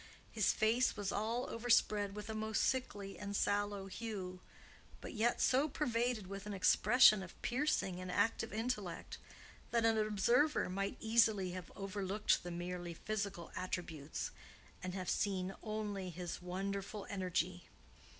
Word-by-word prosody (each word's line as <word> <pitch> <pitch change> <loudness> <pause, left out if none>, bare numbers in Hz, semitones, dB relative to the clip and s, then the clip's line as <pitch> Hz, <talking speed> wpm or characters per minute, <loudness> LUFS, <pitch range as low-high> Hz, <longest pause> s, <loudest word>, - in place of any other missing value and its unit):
His 215 -4 +3
face 225 +3 +2
was 205 -2 -1
all 230 +4 -1
overspread 215 -3 +2
with 210 -1 -6
a 220 - -3
most 220 0 0
sickly 205 -7 -1
and 205 0 -4
sallow 205 -1 0
hue, 195 -3 -5 0.6
but - - -7
yet 235 +1 +2
so 275 +4 +3
pervaded 240 -6 0
with 195 +2 -7
an 205 - -3
expression 215 +3 +6
of 185 -1 -10
piercing 245 -8 0
and 185 0 -5
active 225 +4 +1
intellect 215 -5 -3 0.5
that 230 -1 +2
an 225 -1 +4
observer 215 +8 +3
might 195 +1 -2
easily 220 -4 +3
have 180 -1 -7
overlooked 200 +1 0
the 175 - -6
merely 175 0 -4
physical 200 -3 -3
attributes 170 -5 -4 0.5
and 185 0 -4
have 185 -2 -4
seen 190 -2 0
only 210 -3 -3
this 175 0 -5
wonderful 195 +3 -4
energy. 180 -2 -1
205 Hz, 140 wpm, -36 LUFS, 185-220 Hz, 0.6 s, expression